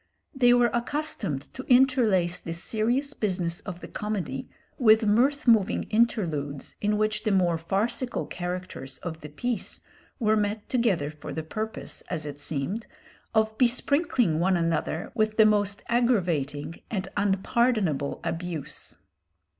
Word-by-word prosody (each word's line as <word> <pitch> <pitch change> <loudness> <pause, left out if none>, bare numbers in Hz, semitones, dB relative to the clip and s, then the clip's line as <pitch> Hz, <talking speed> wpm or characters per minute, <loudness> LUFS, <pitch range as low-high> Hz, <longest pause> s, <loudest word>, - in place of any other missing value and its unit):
They 245 -3 +5
were 245 -1 +4
accustomed 235 - -2
to 260 - -6
interlace 230 -9 +4
the 165 - -5
serious 235 +10 -1
business 180 -4 -1
of 180 -2 -8
the - - -7
comedy 190 -11 -4 0.3
with 220 -2 +6
mirth 255 +7 +2
moving 220 -3 +4
interludes 165 - 0
in 210 0 +1
which 215 0 0
the 220 - +1
more 180 -4 +2
farcical 210 +8 -1
characters 175 -7 -5
of 160 -2 -5
the 150 - -8
piece 225 +7 -3 0.4
were 215 -4 +2
met 210 0 -1
together 200 - +1
for 150 -1 -9
the 160 - -4
purpose, 215 +7 -5
as 160 -4 -3
it 145 -1 -6
seemed, 155 +9 -3 0.5
of 220 0 +2
besprinkling 255 - +2
one 185 +1 +3
another 165 0 -1
with 215 -2 0
the 220 - +7
most 205 -1 +2
aggravating 170 - 0
and 195 -4 -2
unpardonable 200 - +1
abuse. 165 -3 -4
205 Hz, 135 wpm, -27 LUFS, 170-235 Hz, 0.5 s, the